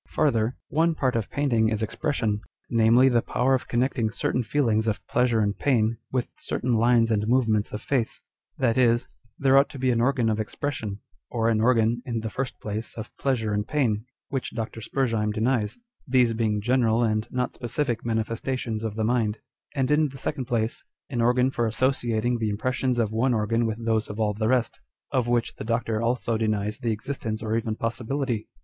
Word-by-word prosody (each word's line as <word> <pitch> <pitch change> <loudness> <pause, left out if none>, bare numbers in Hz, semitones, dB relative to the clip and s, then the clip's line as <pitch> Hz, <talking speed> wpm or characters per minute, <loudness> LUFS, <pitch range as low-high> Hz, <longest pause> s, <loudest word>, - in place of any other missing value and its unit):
Farther, 120 -5 +1
one 165 +2 +2
part 130 -5 0
of 115 -4 -1
painting 120 -6 +2
is 110 0 -1
expression, 110 -4 -1 0.3
namely, 115 +2 +5
the 120 -3 +3
power 130 +4 +1
of 130 - 0
connecting 120 -2 +1
certain 125 +2 -1
feelings 115 -3 +1
of 110 - -2
pleasure 120 -2 +2
and 100 -1 +1
pain 115 -4 +1
with 125 -2 0
certain 125 - -1
lines 115 0 +4
and 105 -1 +1
movements 110 -4 +2
of 105 - -6
face; 125 -5 0 0.4
that 125 -2 +2
is, 120 -1 +3 0.3
there 135 -1 +5
ought 140 - +2
to 140 - -9
be 130 -1 +1
an 115 -1 +1
organ 125 -2 +2
of 110 -1 +1
expression, 110 -3 -4 0.3
or 115 -1 +1
an 110 -1 +2
organ, 115 0 +3
in 120 -4 -3
the 110 -1 -4
first 130 +2 -4
place, 110 +2 -5
of 110 - -7
pleasure 115 -6 0
and 105 +1 -1
pain 145 -7 +2
â€" 105 - -7 0.3
which 135 -2 -3
Dr. 115 -1 -4
Spurzheim 115 -4 0
denies, 110 0 0
â€" - - -29 0.3
these 125 -3 +3
being 110 -2 0
general 120 0 +2
and 110 -1 0
not 125 0 -2
specific 120 0 -2
manifestations 115 0 -2
of 110 -2 -3
the 110 - -1
mind; 115 -2 +1 0.4
and 135 0 +1
in 150 0 +3
the 135 - -10
second 135 0 -3
place, 115 -1 -1 0.3
an 120 -3 0
organ 125 +2 +3
for 120 -3 0
associating 120 -1 0
the 110 -1 0
im 100 - -2
pressions 130 +1 0
of 110 -3 +1
one 120 +3 +2
organ 115 +2 +1
with 110 -1 -2
those 110 -1 +1
of 105 - -6
all 105 -1 +1
the 110 +1 -1
rest 125 -2 +1 0.3
â€" - - +4
of 120 - -1
^iiich 120 -1 0
the - - -5
Doctor 115 -1 -1
also 115 -1 0
denies 105 -1 -1
the 120 - -1
existence 110 -1 -4
or 110 0 -1
even 115 -1 -1
possi 115 +2 -3
bility. 125 -3 -2
115 Hz, 200 wpm, -25 LUFS, 110-130 Hz, 0.4 s, namely